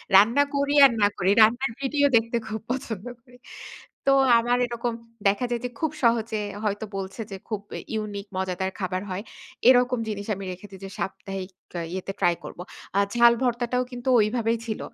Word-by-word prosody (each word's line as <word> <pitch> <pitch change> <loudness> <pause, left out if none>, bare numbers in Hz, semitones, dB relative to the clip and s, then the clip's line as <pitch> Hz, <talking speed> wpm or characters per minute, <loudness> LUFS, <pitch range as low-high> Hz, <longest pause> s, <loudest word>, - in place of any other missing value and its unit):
রান্না 230 +8 +6
করি 280 0 +1
আর, 270 - +6
না 205 - +6
করি। 190 0 +2
রান্নার 240 +4 +4
ভিডিও 285 +1 +2
দেখতে 230 +1 -1
খুব 220 0 -4
পছন্দ 230 -5 -4 0.2
করি। 245 0 -19 0.7
তো, - - +6 0.3
আমার 240 +1 +1
এরকম 235 0 -3 0.3
দেখা 200 +5 +2
যায় 240 -1 -1
যে, - - -2
খুব 315 -3 0
সহজে 230 -2 +2 0.3
হয়তো 205 0 -1
বলছে 195 +3 -5
যে, 195 - -5
খুব 215 -3 -2 0.3
ইউনিক 205 -2 -4
মজাদার 190 0 -2
খাবার 185 -1 -2
হয়। 185 +2 -4 0.5
এরকম 250 -1 +4
জিনিস 205 -1 -5
আমি 195 +1 -7
রেখে 185 +3 -9
দেই 190 - -11
যে, - - -7
সাপ্তাহিক 190 +1 -5 0.4
ইয়েতে 190 +1 -4
ট্রাই 175 - +3
করব। - - -9 0.4
আ - - +5 0.2
ঝাল 235 0 +7
ভর্তাটাও 245 0 0
কিন্তু 245 +1 -4
ওইভাবেই 225 +2 +1
ছিল। 220 - -3
220 Hz, 175 wpm, -25 LUFS, 195-245 Hz, 0.7 s, ঝাল